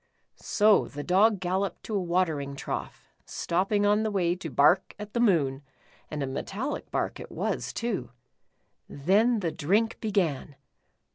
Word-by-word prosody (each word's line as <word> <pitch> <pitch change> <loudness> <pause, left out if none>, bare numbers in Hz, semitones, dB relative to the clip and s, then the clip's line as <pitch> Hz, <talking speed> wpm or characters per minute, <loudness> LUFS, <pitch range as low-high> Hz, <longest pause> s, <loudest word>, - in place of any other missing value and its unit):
So 210 0 +3
the 145 +1 -7
Dog 200 +4 +3
gal 185 +1 0
loped 195 -3 -3
to 220 - -6
a 200 - +1
watering 165 -6 -1
trough, - - -5 0.2
stopping 195 +4 0
on 210 +1 +3
the 220 - 0
way 180 -4 +1
to 175 -3 -6
bark 150 +8 +3
at 210 0 -8
the 235 - 0
moon, 150 - +2 0.5
and 150 -2 -3
a - - 0
metallic 195 - -4
bark - - -2
it - - -9
was - - -2
too. 210 - -3 0.8
Then, 210 - +2
the 170 -3 -1
drink 205 +11 0
began. 175 - -1
185 Hz, 155 wpm, -27 LUFS, 155-210 Hz, 0.8 s, So